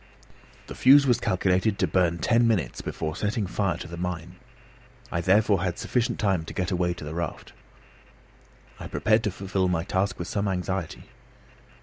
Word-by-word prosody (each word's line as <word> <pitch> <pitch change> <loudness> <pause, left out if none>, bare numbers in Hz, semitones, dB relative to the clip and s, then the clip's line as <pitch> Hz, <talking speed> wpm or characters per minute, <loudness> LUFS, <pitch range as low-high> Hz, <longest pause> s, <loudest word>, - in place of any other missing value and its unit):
The - - -8
fuse 140 +2 +6
was 125 -3 +3
calculated 95 +2 +1
to - - +2
burn 85 -2 +1
ten 115 +6 +3
minutes 90 - 0
before 80 0 -4
setting 105 +2 -1
fire 95 -2 -1
to 90 - -8
the 85 0 -8
mine. 90 0 -5 0.7
I 85 - -1
therefore 100 +1 +3
had 90 -2 -2
sufficient 125 -2 -1
time 95 -6 +1
to - - -9
get 90 +1 -1
away 90 -1 0
to - - -9
the 75 +1 -6
raft. 85 -2 -5 1.3
I - - -7
prepared 110 +1 +2
to - - +2
fulfil 95 0 -1
my 85 -2 0
task 95 +1 -1
with 85 - -5
some 100 0 -1
anxiety. 95 -2 -3
95 Hz, 175 wpm, -26 LUFS, 85-105 Hz, 1.3 s, fuse